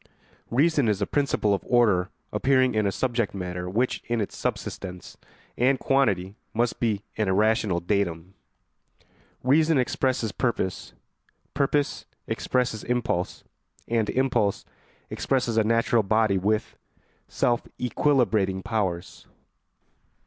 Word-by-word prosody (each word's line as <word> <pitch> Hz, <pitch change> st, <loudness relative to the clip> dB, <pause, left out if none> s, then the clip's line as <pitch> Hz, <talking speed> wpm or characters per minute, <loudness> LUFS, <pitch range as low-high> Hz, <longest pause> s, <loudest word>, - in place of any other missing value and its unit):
Reason 145 Hz, +1 st, +3 dB
is 105 Hz, -3 st, +1 dB
a 100 Hz, -, 0 dB
principle 135 Hz, -7 st, +1 dB
of 100 Hz, -, -1 dB
order 105 Hz, -7 st, +3 dB, 0.2 s
appearing 130 Hz, +3 st, +3 dB
in 110 Hz, -2 st, +1 dB
a -, -, +1 dB
subject 120 Hz, -2 st, -1 dB
matter 90 Hz, -1 st, -4 dB
which 120 Hz, +7 st, 0 dB
in 120 Hz, -1 st, 0 dB
its 105 Hz, -, -3 dB
subsistence 90 Hz, -2 st, -5 dB, 0.4 s
and 130 Hz, +2 st, +4 dB
quantity 100 Hz, -10 st, +1 dB, 0.2 s
must 120 Hz, +1 st, 0 dB
be 105 Hz, -4 st, 0 dB
an 110 Hz, -2 st, 0 dB
irrational 105 Hz, -1 st, +2 dB
datum. 90 Hz, -2 st, -2 dB, 1.1 s
Reason 155 Hz, +4 st, +4 dB
expresses 130 Hz, -3 st, 0 dB
purpose, 110 Hz, -7 st, -2 dB, 0.6 s
purpose 140 Hz, 0 st, 0 dB, 0.2 s
expresses 125 Hz, -4 st, -1 dB
impulse, 120 Hz, -7 st, -2 dB, 0.4 s
and 115 Hz, -2 st, 0 dB
impulse 125 Hz, -6 st, +1 dB, 0.5 s
expresses 125 Hz, -4 st, 0 dB
a 110 Hz, -, +4 dB
natural 115 Hz, +1 st, +2 dB
body 110 Hz, -1 st, +2 dB
with 105 Hz, +3 st, -1 dB, 0.5 s
self 120 Hz, -1 st, 0 dB
equilibrating 115 Hz, -8 st, +1 dB
powers. 95 Hz, -6 st, -3 dB
110 Hz, 115 wpm, -25 LUFS, 100-125 Hz, 1.1 s, and